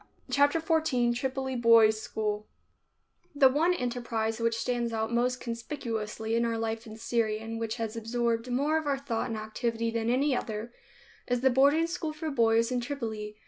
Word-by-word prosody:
CHAPTER 285 Hz, +3 st, +4 dB
XIV 310 Hz, -7 st, +1 dB
TRIPOLI 265 Hz, +1 st, -2 dB
BOYS' 225 Hz, -2 st, +5 dB
SCHOOL 210 Hz, -1 st, -3 dB, 0.9 s
The 275 Hz, -2 st, +6 dB
one 325 Hz, +7 st, +2 dB
enterprise 235 Hz, -4 st, -2 dB
which 230 Hz, 0 st, +1 dB
stands 235 Hz, -1 st, -1 dB
out 220 Hz, +1 st, -2 dB
most 250 Hz, +1 st, +1 dB
conspicuously 230 Hz, -3 st, -4 dB
in 235 Hz, -, +2 dB
our 230 Hz, -1 st, 0 dB
life 225 Hz, +1 st, -3 dB
in 220 Hz, 0 st, -9 dB
Syria 225 Hz, -1 st, 0 dB
and 225 Hz, 0 st, -5 dB
which 225 Hz, 0 st, -2 dB
has 225 Hz, -2 st, -4 dB
absorbed 230 Hz, +1 st, -1 dB
more 290 Hz, +5 st, +2 dB
of 315 Hz, -, -6 dB
our 280 Hz, -1 st, +1 dB
thought 255 Hz, -4 st, -3 dB
and 225 Hz, -, -3 dB
activity 230 Hz, +1 st, -2 dB
than 230 Hz, 0 st, -1 dB
any 265 Hz, +3 st, +2 dB
other, 225 Hz, 0 st, -4 dB, 0.5 s
is 245 Hz, -1 st, 0 dB
the 265 Hz, 0 st, +4 dB
boarding 285 Hz, +6 st, +4 dB
school 330 Hz, -2 st, -3 dB
for 310 Hz, 0 st, -4 dB
boys 230 Hz, -2 st, +3 dB
in 250 Hz, -1 st, 0 dB
Tripoli. 225 Hz, -5 st, -5 dB
235 Hz, 175 wpm, -29 LUFS, 225-265 Hz, 0.9 s, The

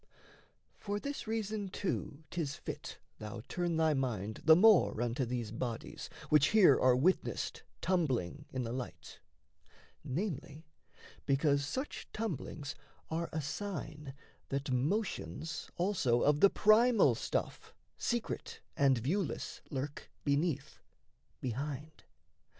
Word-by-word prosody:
For 205 Hz, 0 st, -2 dB
this 280 Hz, 0 st, -5 dB
reason 215 Hz, -2 st, -2 dB
too 170 Hz, -6 st, -3 dB
'tis 155 Hz, -5 st, -2 dB
fit -, -, -7 dB, 0.2 s
Thou 105 Hz, 0 st, -6 dB
turn 175 Hz, -2 st, -1 dB
thy 160 Hz, -1 st, +4 dB
mind 110 Hz, -6 st, -2 dB
the 160 Hz, -, +8 dB
more 205 Hz, -, +6 dB
unto 120 Hz, +2 st, 0 dB
these 120 Hz, -3 st, -3 dB
bodies 115 Hz, 0 st, -4 dB, 0.2 s
Which 150 Hz, -2 st, +6 dB
here 205 Hz, -9 st, +7 dB
are 130 Hz, -1 st, +5 dB
witnessed 170 Hz, +9 st, +1 dB, 0.2 s
tumbling 145 Hz, -, 0 dB
in 130 Hz, -1 st, -2 dB
the 115 Hz, -, -3 dB
light: 125 Hz, -1 st, -7 dB, 0.8 s
Namely, 160 Hz, 0 st, -4 dB, 0.6 s
because 140 Hz, 0 st, +2 dB
such 265 Hz, -, -4 dB
tumblings 160 Hz, -, -4 dB, 0.4 s
are 165 Hz, +1 st, -1 dB
a 155 Hz, -1 st, -2 dB
sign 150 Hz, -3 st, -5 dB, 0.3 s
That 140 Hz, 0 st, -2 dB
motions 160 Hz, -, -1 dB
also 170 Hz, -11 st, +2 dB
of 150 Hz, 0 st, +4 dB
the 200 Hz, -, +8 dB
primal 220 Hz, +3 st, +5 dB
stuff -, -, -3 dB, 0.2 s
Secret 240 Hz, -2 st, -2 dB, 0.2 s
and 135 Hz, -2 st, +4 dB
viewless 155 Hz, -, -2 dB
lurk 140 Hz, +1 st, -4 dB
beneath, 145 Hz, +1 st, 0 dB, 0.6 s
behind. 140 Hz, +5 st, -4 dB
150 Hz, 115 wpm, -33 LUFS, 130-185 Hz, 0.8 s, the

